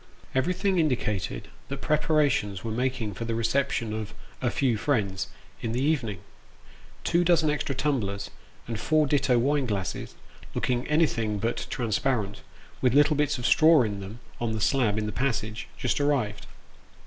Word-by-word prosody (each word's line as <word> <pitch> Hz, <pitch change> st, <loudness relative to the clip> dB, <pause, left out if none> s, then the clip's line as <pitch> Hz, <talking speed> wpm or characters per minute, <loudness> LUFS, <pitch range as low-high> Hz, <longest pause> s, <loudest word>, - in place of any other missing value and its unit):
Everything 180 Hz, +7 st, +1 dB
indicated 105 Hz, -, -1 dB, 0.2 s
that 140 Hz, -, -5 dB
preparations 150 Hz, -, +1 dB
were 115 Hz, -, -3 dB
making 125 Hz, -2 st, -1 dB
for -, -, -5 dB
the 115 Hz, 0 st, -2 dB
recep 115 Hz, +5 st, +1 dB
tion 115 Hz, -5 st, -2 dB
of 110 Hz, -1 st, -5 dB
" -, -, -25 dB
a -, -, +2 dB
few 130 Hz, -4 st, +1 dB
friends 105 Hz, -, 0 dB, 0.2 s
" -, -, -26 dB
in 115 Hz, -1 st, -2 dB
the 120 Hz, -, 0 dB
evening. 125 Hz, -, 0 dB, 0.8 s
Two 170 Hz, +1 st, +2 dB
dozen 165 Hz, -3 st, +3 dB
extra 145 Hz, -2 st, -2 dB
tumblers, 105 Hz, -9 st, -1 dB, 0.4 s
and 115 Hz, -2 st, -3 dB
four 155 Hz, -1 st, +3 dB
ditto 135 Hz, -3 st, +2 dB
wine 140 Hz, +2 st, +2 dB
glasses 100 Hz, -3 st, -3 dB, 0.4 s
looking 125 Hz, 0 st, 0 dB
anything 120 Hz, -9 st, +1 dB
but 115 Hz, +4 st, -2 dB
transparent, 110 Hz, -3 st, -1 dB, 0.4 s
with 125 Hz, 0 st, +3 dB
little 145 Hz, +1 st, +5 dB
bits 145 Hz, -1 st, +1 dB
of 120 Hz, -, -5 dB
straw 155 Hz, -1 st, +6 dB
in 105 Hz, -3 st, -3 dB
them 100 Hz, +3 st, -8 dB, 0.2 s
were 120 Hz, -, -1 dB
on 110 Hz, -, -1 dB
the 110 Hz, -, -2 dB
slab 110 Hz, -2 st, +2 dB
in 110 Hz, -, -1 dB
the 105 Hz, -, -3 dB
passage, 110 Hz, -3 st, -2 dB
just 130 Hz, +3 st, 0 dB
arrived. 125 Hz, -8 st, 0 dB
125 Hz, 170 wpm, -27 LUFS, 110-145 Hz, 0.8 s, straw